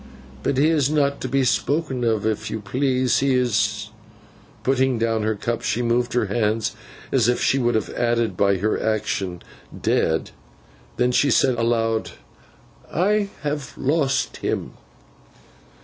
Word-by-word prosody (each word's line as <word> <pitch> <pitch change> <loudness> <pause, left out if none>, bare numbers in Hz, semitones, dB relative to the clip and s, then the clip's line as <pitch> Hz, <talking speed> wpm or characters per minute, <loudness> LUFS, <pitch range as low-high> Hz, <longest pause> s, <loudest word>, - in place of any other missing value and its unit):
But 130 - -1
he 150 +4 +4
is 150 -4 +2
not 140 -2 +1
to - - -2
be 135 +1 +1
spoken 130 +4 0
of 110 -3 +1
if 110 0 -1
you 110 - -3
please. 130 +4 +1
He 135 -1 +2
is—' 125 -3 0 0.7
Putting 130 -1 +2
down 115 -1 0
her 110 0 0
cup, 115 +3 -3
she 120 - -1
moved 120 +1 +1
her 120 -2 +2
hands 110 +1 0 0.4
as - - +3
if 125 - +1
she 135 - +2
would 120 -2 +1
have 110 - -1
added, 120 -1 0
by 100 -1 +2
her 105 +4 0
action, 100 -5 -2 0.4
'dead!' - - 0 0.7
Then 125 0 +2
she 140 +3 +3
said 130 - +4
aloud, 115 -1 0 0.8
'I 205 +4 +1
have 145 -3 -3
lost 140 -1 0
him. - - -3
120 Hz, 150 wpm, -22 LUFS, 110-135 Hz, 0.8 s, he